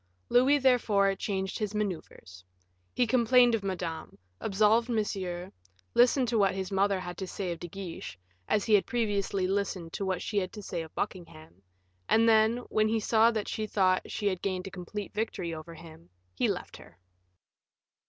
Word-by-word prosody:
Louis, 260 +4 +5
therefore, 225 -7 +3
changed 190 -1 -3
his 210 -1 -3
maneuvers. 170 - -5 0.5
He 250 - +3
complained 245 0 +4
of 225 - +1
Madame, 175 -5 -5 0.2
absolved 215 +4 +2
Monsieur, 190 -5 -2 0.4
listened 250 +1 +4
to 230 -2 +1
what 195 -2 +3
his 190 0 -4
mother 195 0 +2
had 180 -1 -7
to 190 - -4
say 185 0 -4
of 170 - -5
De 175 - -6
Guiche, 170 - -7 0.3
as 210 - +1
he 220 - +2
had 205 - +4
previously 205 -5 0
listened 190 -3 -2
to - - -3
what 185 -2 -2
she 210 - 0
had 185 -1 -3
to 210 - -8
say 175 -3 -4
of 160 -1 -10
Buckingham, 95 - -6 0.5
and 225 +1 +4
then, 220 +1 +4
when 215 0 +2
he 225 +1 +1
saw 220 +1 +4
that 220 -3 -2
she 215 -1 -3
thought 185 -3 +1
she 210 - -4
had 185 -3 0
gained 185 -2 -2
a 195 - -7
complete 195 +3 -7
victory 205 -5 -3
over 160 +1 -8
him, 155 - -14 0.2
he - - +1
left - - -4
her. 85 - -16
200 Hz, 180 wpm, -29 LUFS, 180-220 Hz, 0.5 s, Louis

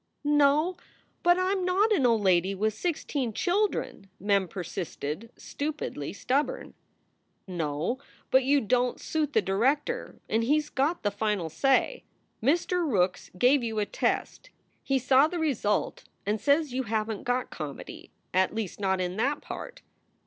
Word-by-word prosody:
"No, 295 +4 +3 0.4
but 350 0 +5
I 370 +1 +1
m 390 -2 0
not 385 +5 +2
an 285 -12 +4
old 225 -3 +2
lady 185 +1 +3
with 215 +2 0
sixteen 285 - -2
children," 365 - -1
Mem 200 -1 +2
persisted, 175 +2 -5
stupidly 290 - -4
stubborn. 260 +9 -1 0.7
"No, 165 - -2 0.3
but 260 0 +5
you 280 +2 +3
don 245 +3 +1
t - - -19
suit 305 -2 -1
the 220 - +3
director 275 - 0
and 225 +1 +1
he 290 +6 +3
s 300 -1 -2
got 295 +6 0
the 205 - +1
final 205 -4 -1
say. 270 - +2 0.4
Mr. 345 +7 +2
Rookes 180 -3 +1
gave 255 +7 +4
you 225 -2 -3
a 210 - +1
test. - - -2 0.3
He 270 - +1
saw 265 +3 +5
the 350 - -4
result 265 -10 0 0.2
and 210 +1 -1
says 290 -1 +2
you 260 - 0
haven 220 0 -1
t - - -13
got 245 +1 -1
comedy 150 -4 -8 0.2
at 185 +3 +2
least 215 -4 -4
not 190 -2 +1
in 180 +1 -2
that 275 +6 +1
part. - - -8
250 Hz, 155 wpm, -28 LUFS, 200-295 Hz, 0.7 s, but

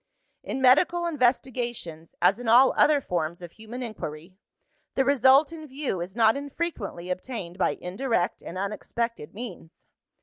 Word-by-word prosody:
"In 265 - -4
medical 340 +7 +4
investigations, 240 - -1
as 200 - +4
in 245 - -6
all 245 +4 +6
other 295 -2 +4
forms 170 -4 -3
of 170 - -8
human 220 +5 -8
inquiry, 180 -6 -7 0.6
the 265 - +2
result 275 +3 +5
in 315 -2 -9
view 265 - -3
is 185 +3 -6
not 225 -1 +4
infrequently 280 - -4
obtained 185 -2 -5
by - - +1
indirect 195 0 -1
and 175 - -8
unexpected 210 -1 -4
means. 210 -8 -9
235 Hz, 140 wpm, -26 LUFS, 180-265 Hz, 0.6 s, all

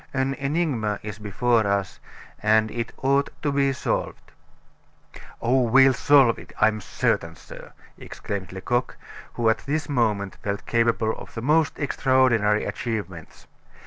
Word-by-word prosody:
An 130 +1 0
enigma 135 -8 -1
is 105 0 -7
before 110 +2 +1
us; 100 -1 -2 0.4
and 110 +1 +3
it 115 0 -4
ought 140 +1 +2
to 145 - +1
be 140 -1 +2
solved." 130 - -3 1.1
"Oh! 130 +3 +2
we'll 130 +3 +5
solve 135 -2 +4
it, - - -13
I 105 - +5
am 110 -1 -5
certain, - - -1
sir," - - -13 0.3
exclaimed 100 -3 -6
Lecoq, 120 +7 -2 0.4
who 115 - 0
at 110 - +3
this 150 +2 -3
moment 110 -8 -1
felt 100 0 -4
capable 115 -1 +1
of - - -12
the 115 - -5
most 155 +3 +2
extraordinary 130 -7 +2
achievements. 95 -8 -6
115 Hz, 140 wpm, -24 LUFS, 105-135 Hz, 1.1 s, we'll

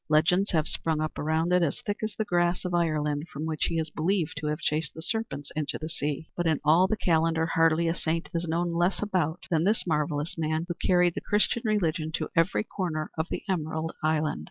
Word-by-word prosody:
Legends 175 +6 +3
have 160 -2 +1
sprung 160 -2 -1
up 155 0 -3
around 160 +3 +1
it 180 - +4
as 165 -4 0
thick 205 0 -2
as 215 -1 -3
the 220 - 0
grass 175 -1 +1
of 180 - -2
Ireland 155 -3 0
from 150 +3 -4
which 155 -1 -1
he 165 - -1
is 160 -1 -2
believed 170 +1 0
to 155 0 -3
have 150 0 0
chased 150 0 -1
the 160 - -7
serpents 195 -10 -3
into 155 -2 -2
the 155 +1 -6
sea 150 0 -3
but 175 -1 0
in 155 -3 +2
all 165 +5 +6
the 215 - 0
calendar 165 -2 +2
hardly 165 0 +3
a 165 - +2
saint 165 +1 -2
is 170 0 -1
known 170 +1 0
less 175 +4 +1
about 180 -4 -1
than 160 -1 +3
this 210 +4 +2
marvelous 150 -1 -1
man, 155 +1 0
who 175 - -2
carried 180 -1 +4
the - - -4
Christian 210 +3 +2
religion 170 -7 0
to - - -2
every 165 +5 +2
corner 170 -7 -3
of 160 +1 -1
the - - -4
emerald 160 -3 -1
island. 155 - +1
165 Hz, 225 wpm, -27 LUFS, 155-175 Hz, -, all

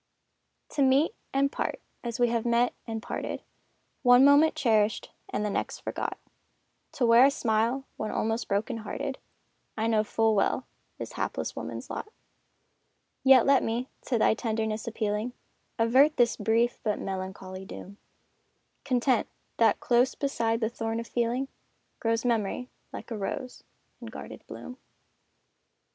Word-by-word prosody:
To 285 - -2
meet, 275 +7 +4 0.2
and 275 +1 +2
part, - - -2 0.2
as 235 -1 -4
we 240 -1 +4
have 230 -1 0
met 240 +1 +2
and 225 -1 -4
parted, - - -4 0.6
One 245 0 +7
moment 285 +3 +6
cherished 220 -4 +1 0.2
and 210 - -2
the 210 - -1
next - - -3
forgot, - - -3 0.8
To 250 - +1
wear 230 +1 +7
a - - +6
smile 235 +1 0
when 215 - -3
almost 225 +2 -1
broken 215 +4 -1
hearted, 225 +5 -4 0.6
I 220 - 0
know 220 -2 +3
full 225 +1 +2
well 215 +5 +1 0.3
is - - -6
hapless - - -3
woman's - - -6
lot; - - -4 1.2
Yet 265 -3 +7
let 275 -1 +5
me, 235 +3 -2 0.2
to 245 - +1
thy 220 - +4
tenderness 220 -1 -2
appealing, 215 +1 -2 0.4
Avert 260 +6 +4
this 240 -2 +4
brief 225 +3 +1
but 210 -1 0
melancholy 190 0 -5
doom 200 +1 -10 0.9
Content 255 -2 +2 0.3
that 230 - +4
close 245 +1 +2
beside 230 -5 0
the 220 - +1
thorn 225 -1 -3
of 230 - -5
feeling, 240 +3 -1 0.5
Grows 230 +1 0
memory, 235 +1 -1 0.2
like - - -8
a 225 - -2
rose, 250 +6 -5 0.4
in - - -9
guarded - - -9
bloom. 250 - -9
230 Hz, 145 wpm, -28 LUFS, 220-255 Hz, 1.2 s, One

